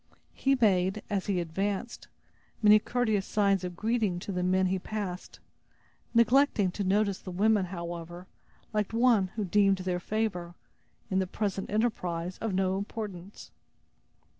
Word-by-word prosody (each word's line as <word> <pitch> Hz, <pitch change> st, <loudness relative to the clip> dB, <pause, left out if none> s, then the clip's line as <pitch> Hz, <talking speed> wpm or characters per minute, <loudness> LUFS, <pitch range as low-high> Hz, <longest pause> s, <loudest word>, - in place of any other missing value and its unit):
He 275 Hz, 0 st, +1 dB
made, 195 Hz, -2 st, +2 dB
as 200 Hz, -2 st, -1 dB
he 195 Hz, -3 st, +1 dB
advanced, 195 Hz, +7 st, -3 dB, 0.6 s
many 210 Hz, 0 st, +8 dB
courteous 220 Hz, -4 st, 0 dB
signs 200 Hz, -3 st, +2 dB
of 180 Hz, -1 st, -5 dB
greeting 220 Hz, -2 st, 0 dB
to 200 Hz, -, -5 dB
the 180 Hz, -1 st, -2 dB
men 185 Hz, +1 st, +2 dB
he 185 Hz, 0 st, 0 dB
passed, 195 Hz, -2 st, -5 dB, 0.8 s
neglecting 235 Hz, -4 st, +4 dB
to 200 Hz, -, -3 dB
notice 200 Hz, 0 st, +1 dB
the -, -, -9 dB
women, 205 Hz, +2 st, +2 dB
however, 175 Hz, -1 st, -7 dB, 0.5 s
like 210 Hz, 0 st, -1 dB
one 230 Hz, -4 st, +4 dB
who 215 Hz, -2 st, -1 dB
deemed 195 Hz, +1 st, +3 dB
their 185 Hz, -1 st, -2 dB
favor, 180 Hz, -4 st, -2 dB, 0.6 s
in 190 Hz, -, +2 dB
the 190 Hz, -, 0 dB
present 195 Hz, 0 st, -3 dB
enterprise, 185 Hz, -6 st, -1 dB
of 225 Hz, -, -2 dB
no 190 Hz, 0 st, 0 dB
importance. 200 Hz, -2 st, -7 dB
195 Hz, 140 wpm, -29 LUFS, 180-215 Hz, 0.8 s, many